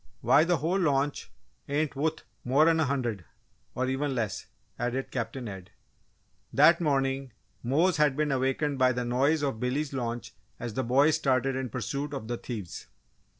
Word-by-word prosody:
"Why, 150 Hz, -, +5 dB
the 175 Hz, 0 st, +2 dB
whole 170 Hz, +7 st, 0 dB
launch 145 Hz, -4 st, 0 dB, 0.4 s
ain't 145 Hz, 0 st, 0 dB
wuth 155 Hz, +3 st, -1 dB, 0.2 s
more'n 155 Hz, +6 st, +4 dB
a 160 Hz, -, +3 dB
hundred, 120 Hz, -8 st, -2 dB, 0.5 s
or 130 Hz, -, 0 dB
even 135 Hz, +1 st, -1 dB
less!" 110 Hz, -5 st, -3 dB, 0.3 s
added 125 Hz, +2 st, -2 dB
Captain 120 Hz, 0 st, -4 dB
Ed. 95 Hz, -3 st, -8 dB, 0.8 s
That 170 Hz, +1 st, +5 dB
morning, 135 Hz, -4 st, 0 dB, 0.3 s
Mose 155 Hz, +8 st, +2 dB
had 150 Hz, -3 st, +3 dB
been 150 Hz, -1 st, +1 dB
awakened 135 Hz, +2 st, 0 dB
by 130 Hz, 0 st, +4 dB
the 125 Hz, 0 st, -2 dB
noise 140 Hz, +6 st, +2 dB
of 135 Hz, -6 st, -1 dB
Billy's 135 Hz, +4 st, -1 dB
launch 120 Hz, -2 st, -4 dB, 0.3 s
as 120 Hz, -2 st, -5 dB
the 130 Hz, -, -1 dB
boys 140 Hz, +6 st, +4 dB
started 130 Hz, 0 st, +1 dB
in 130 Hz, -1 st, -3 dB
pursuit 140 Hz, +5 st, -3 dB
of 110 Hz, -5 st, -6 dB
the 120 Hz, 0 st, -2 dB
thieves. 105 Hz, -9 st, -7 dB
135 Hz, 160 wpm, -28 LUFS, 125-150 Hz, 0.8 s, Why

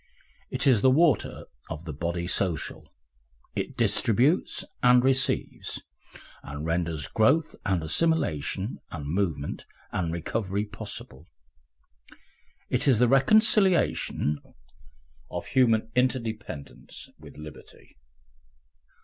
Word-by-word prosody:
It -, -, -1 dB
is 125 Hz, -7 st, +5 dB
the 130 Hz, -, +5 dB
water 145 Hz, -3 st, +2 dB, 0.2 s
of 80 Hz, +1 st, -6 dB
the 80 Hz, -, -5 dB
body 85 Hz, +3 st, -3 dB
social, 90 Hz, -2 st, -1 dB, 0.6 s
it -, -, -4 dB
distributes 130 Hz, -, +2 dB, 0.2 s
and 125 Hz, 0 st, +6 dB
receives, 135 Hz, 0 st, +1 dB, 0.6 s
and 70 Hz, +2 st, -7 dB
renders 80 Hz, -3 st, -1 dB
growth 140 Hz, +9 st, +2 dB
and 95 Hz, -4 st, +1 dB
assimilation 95 Hz, -, 0 dB
and 75 Hz, -4 st, -6 dB
movement 80 Hz, -3 st, -2 dB, 0.2 s
and 85 Hz, -3 st, -1 dB
recovery 100 Hz, +4 st, -2 dB
possible. 75 Hz, -7 st, -7 dB, 1.4 s
It -, -, 0 dB
is 130 Hz, -5 st, +5 dB
the 125 Hz, +2 st, +4 dB
reconciliation 185 Hz, -, +3 dB, 0.9 s
of -, -, -5 dB
human 115 Hz, -3 st, +2 dB
interdependence 115 Hz, -, -3 dB
with -, -, -13 dB
liberty. 75 Hz, 0 st, -12 dB
100 Hz, 100 wpm, -27 LUFS, 80-130 Hz, 1.4 s, and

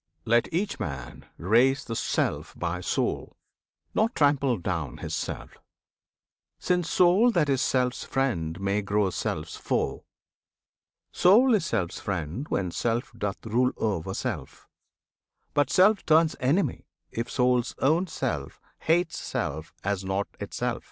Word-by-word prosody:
Let 120 Hz, +1 st, +2 dB
each 195 Hz, +5 st, -1 dB
man 65 Hz, -5 st, -6 dB
raise 120 Hz, +9 st, +3 dB
The 115 Hz, -, -4 dB
Self -, -, -1 dB
by -, -, -2 dB
Soul, -, -, -2 dB, 0.6 s
not 225 Hz, +3 st, +1 dB
trample 140 Hz, -4 st, +3 dB
down 85 Hz, -7 st, -3 dB
his -, -, -6 dB
Self, -, -, -5 dB, 1.0 s
Since 180 Hz, -2 st, 0 dB
Soul 185 Hz, +7 st, +5 dB
that 155 Hz, -5 st, +2 dB
is 135 Hz, -1 st, +2 dB
Self's 125 Hz, -2 st, +1 dB
friend 90 Hz, -11 st, -1 dB
may 100 Hz, +1 st, 0 dB
grow 100 Hz, -1 st, +1 dB
Self's 80 Hz, -, -3 dB
foe. -, -, -1 dB, 1.1 s
Soul 230 Hz, +8 st, +5 dB
is 185 Hz, -6 st, +2 dB
Self's 95 Hz, -7 st, -1 dB
friend 95 Hz, -, -3 dB
when 90 Hz, -3 st, -1 dB
Self 120 Hz, -, -1 dB
doth 105 Hz, -2 st, -4 dB
rule 125 Hz, +3 st, +2 dB
o'er 100 Hz, -7 st, -1 dB
Self, -, -, -5 dB, 0.9 s
But 145 Hz, 0 st, +2 dB
Self 200 Hz, +3 st, +4 dB
turns 160 Hz, 0 st, +4 dB
enemy 145 Hz, +9 st, 0 dB, 0.2 s
if 115 Hz, +1 st, -3 dB
Soul's 125 Hz, -2 st, +1 dB
own 165 Hz, +7 st, +2 dB
self -, -, -3 dB, 0.2 s
Hates 170 Hz, +1 st, +1 dB
Self 80 Hz, +2 st, -4 dB
as 100 Hz, -1 st, -1 dB
not 95 Hz, +1 st, -1 dB
itself. -, -, -3 dB
125 Hz, 130 wpm, -27 LUFS, 100-160 Hz, 1.1 s, Soul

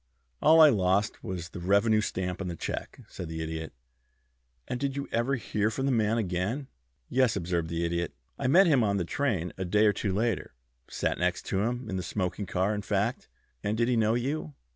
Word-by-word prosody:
"All 160 Hz, +1 st, +6 dB
I 155 Hz, -2 st, +9 dB
lost 100 Hz, 0 st, +1 dB
was 90 Hz, -3 st, -5 dB
the 90 Hz, -, -8 dB
revenue 100 Hz, +4 st, +3 dB
stamp 90 Hz, -2 st, -3 dB
on 95 Hz, -, -3 dB
the 85 Hz, -, -4 dB
check," -, -, -5 dB
said 90 Hz, -, -7 dB
the 80 Hz, 0 st, -4 dB
Idiot. 80 Hz, 0 st, -5 dB, 1.0 s
"And 125 Hz, -, -3 dB
did 140 Hz, 0 st, -1 dB
you 140 Hz, 0 st, -3 dB
ever 120 Hz, +4 st, +1 dB
hear 110 Hz, -4 st, -1 dB
from 130 Hz, +5 st, -2 dB
the 135 Hz, -, +2 dB
man 110 Hz, -2 st, +2 dB
again?" 105 Hz, +7 st, -2 dB, 0.4 s
"Yes," 130 Hz, -3 st, +2 dB
observed 85 Hz, -1 st, -1 dB
the 85 Hz, 0 st, -1 dB
Idiot. 85 Hz, -1 st, -2 dB, 0.2 s
"I 135 Hz, -, 0 dB
met 185 Hz, +9 st, +6 dB
him 140 Hz, -8 st, +4 dB
on 100 Hz, -2 st, +1 dB
the 90 Hz, -, -1 dB
train 95 Hz, -6 st, -1 dB
a -, -, 0 dB
day 105 Hz, +4 st, +3 dB
or 105 Hz, -, +5 dB
two 100 Hz, 0 st, -2 dB
later 110 Hz, -, -1 dB, 0.3 s
sat -, -, -2 dB
next 90 Hz, +1 st, 0 dB
to 95 Hz, -, +2 dB
him 120 Hz, +2 st, -2 dB
in 95 Hz, -3 st, -3 dB
the -, -, -2 dB
smoking 90 Hz, +2 st, -3 dB
car, 95 Hz, +4 st, 0 dB
in 105 Hz, -, -2 dB
fact." 105 Hz, +4 st, -1 dB, 0.4 s
"And 105 Hz, +1 st, -1 dB
did 120 Hz, 0 st, +2 dB
he 125 Hz, -, +2 dB
know 110 Hz, 0 st, +3 dB
you?" 140 Hz, +4 st, -2 dB
105 Hz, 210 wpm, -28 LUFS, 90-120 Hz, 1.0 s, I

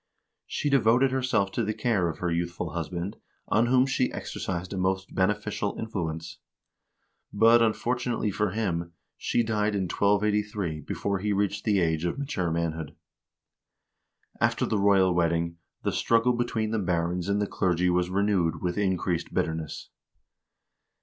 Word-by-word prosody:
She -, -, -2 dB
devoted 130 Hz, 0 st, +4 dB
herself 125 Hz, -7 st, +1 dB
to 120 Hz, -, -1 dB
the 105 Hz, 0 st, -2 dB
care 100 Hz, -8 st, +1 dB
of 80 Hz, -, -5 dB
her 90 Hz, -1 st, -2 dB
youthful 85 Hz, +1 st, -2 dB
husband, 85 Hz, +3 st, -4 dB, 0.3 s
on 115 Hz, +3 st, +3 dB
whom 130 Hz, +1 st, +4 dB
she 130 Hz, -1 st, 0 dB
exercised 90 Hz, +1 st, -4 dB
a -, -, -4 dB
most 95 Hz, +1 st, -1 dB
beneficial 105 Hz, +1 st, 0 dB
influence. 85 Hz, -8 st, -4 dB, 0.9 s
But, 115 Hz, +3 st, +5 dB
unfortunately 120 Hz, 0 st, 0 dB
for 105 Hz, +1 st, 0 dB
him, 85 Hz, -5 st, -2 dB, 0.2 s
she 120 Hz, -, 0 dB
died 105 Hz, -2 st, 0 dB
in 100 Hz, -, 0 dB
1283 105 Hz, -2 st, 0 dB
before 100 Hz, +5 st, -2 dB
he 105 Hz, +2 st, -1 dB
reached 100 Hz, 0 st, -1 dB
the 105 Hz, -3 st, +3 dB
age 80 Hz, -2 st, +1 dB
of 85 Hz, -, -1 dB
mature 135 Hz, -, -2 dB
manhood. 80 Hz, -2 st, -2 dB, 1.4 s
After -, -, +2 dB
the 110 Hz, -, 0 dB
royal 95 Hz, -2 st, +4 dB
wedding 85 Hz, 0 st, 0 dB, 0.3 s
the -, -, +1 dB
struggle 115 Hz, +2 st, +2 dB
between 115 Hz, -2 st, -1 dB
the 110 Hz, -, 0 dB
barons 90 Hz, 0 st, -1 dB
and 100 Hz, +1 st, +2 dB
the 105 Hz, -, +1 dB
clergy 90 Hz, -2 st, +1 dB
was 90 Hz, 0 st, +1 dB
renewed 95 Hz, -4 st, +1 dB
with 90 Hz, +3 st, -2 dB
increased 95 Hz, -3 st, 0 dB
bitterness. 80 Hz, -1 st, -3 dB
100 Hz, 145 wpm, -27 LUFS, 85-110 Hz, 1.4 s, But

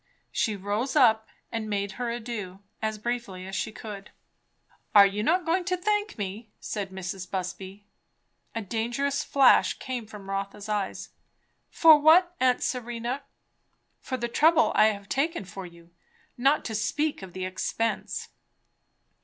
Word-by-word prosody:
She 215 Hz, -, 0 dB
rose 205 Hz, +8 st, -2 dB
up 220 Hz, -6 st, +5 dB, 0.2 s
and 225 Hz, -2 st, -3 dB
made 200 Hz, -1 st, -1 dB
her 240 Hz, +4 st, -3 dB
adieux, 225 Hz, -5 st, -5 dB, 0.2 s
as 220 Hz, 0 st, -1 dB
briefly 215 Hz, -5 st, -4 dB
as 190 Hz, 0 st, -6 dB
she 220 Hz, -, -2 dB
could. 210 Hz, -2 st, -9 dB, 0.9 s
"Are 200 Hz, -1 st, +10 dB
you 200 Hz, +1 st, -1 dB
not 340 Hz, +9 st, +2 dB
going 350 Hz, +3 st, +1 dB
to 365 Hz, 0 st, 0 dB
thank 415 Hz, +3 st, -1 dB
me?" 205 Hz, +2 st, -5 dB
said 200 Hz, -2 st, -4 dB
Mrs. 190 Hz, -1 st, -6 dB
Busby. 190 Hz, +2 st, -5 dB, 0.7 s
A 225 Hz, -, -2 dB
dangerous 240 Hz, +8 st, -1 dB
flash 275 Hz, -2 st, +4 dB
came 250 Hz, -4 st, -5 dB
from 205 Hz, -2 st, -11 dB
Rotha's 200 Hz, +1 st, -4 dB
eyes. 205 Hz, -2 st, -3 dB, 0.6 s
"For 315 Hz, -2 st, +7 dB
what, 345 Hz, +4 st, +5 dB
aunt 255 Hz, -1 st, +3 dB
Serena?" 240 Hz, +1 st, -3 dB, 0.8 s
"For 260 Hz, -, -4 dB
the 240 Hz, -, -2 dB
trouble 315 Hz, +6 st, +4 dB
I -, -, +6 dB
have 200 Hz, -2 st, -3 dB
taken 275 Hz, -, -1 dB
for 190 Hz, 0 st, -8 dB
you, 170 Hz, 0 st, -17 dB, 0.4 s
not 275 Hz, +5 st, +2 dB
to 225 Hz, -, -4 dB
speak 285 Hz, +8 st, -1 dB
of 190 Hz, -2 st, -10 dB
the 185 Hz, 0 st, -4 dB
expense." 225 Hz, +4 st, -2 dB
220 Hz, 145 wpm, -27 LUFS, 195-265 Hz, 0.9 s, Are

